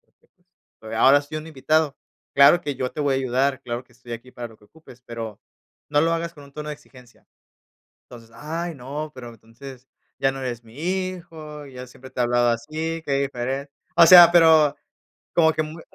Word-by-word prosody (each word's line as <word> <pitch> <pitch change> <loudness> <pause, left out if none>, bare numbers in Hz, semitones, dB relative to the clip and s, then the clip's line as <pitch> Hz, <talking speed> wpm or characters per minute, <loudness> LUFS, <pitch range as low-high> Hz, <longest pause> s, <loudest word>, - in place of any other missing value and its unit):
porque, - - -38 0.5
pues, 110 0 -8
ahora 135 +5 +5
soy 150 +2 -7
un 155 +1 -9
invitado. 155 0 0 0.4
Claro 140 +5 +7
que 145 -5 -4
yo 125 0 -3
te - - -5
voy 140 -2 +1
a - - +1
ayudar, 130 +1 0
claro 120 +1 -4
que 125 - -27
estoy 120 -1 -12
aquí 120 +2 -8
para 120 -1 -7
lo 110 - -17
que - - -24
ocupes, 140 -4 -18
pero, 115 -3 -7 0.5
no 145 - +3
lo 165 +2 +2
hagas 170 0 -2
con 145 -2 -13
un 140 - -17
tono 150 +1 -7
de - - -4
exigencia". 130 -4 -20 0.8
Entonces: 115 -2 -14
"Ay, 165 +4 -5
no, 145 +4 -6
pero 125 -2 -9
entonces, 120 +4 -13 0.3
ya 135 0 +1
no 135 - -7
eres 120 -2 -5
mi 115 0 -17
hijo, 170 -4 -5
yo 125 -1 -10
siempre 130 +1 -14
te 125 - -6
he - - +4
hablado 120 0 +2
así, 155 +7 -3
qué 140 - -3
diferen". 135 +1 -3 0.3
O 165 - +8
sea, 175 -1 +10
pero 160 -4 +6 0.6
como 160 -2 +5
que, 155 - 0
mu 155 +2 -9
140 Hz, 205 wpm, -23 LUFS, 125-155 Hz, 0.8 s, sea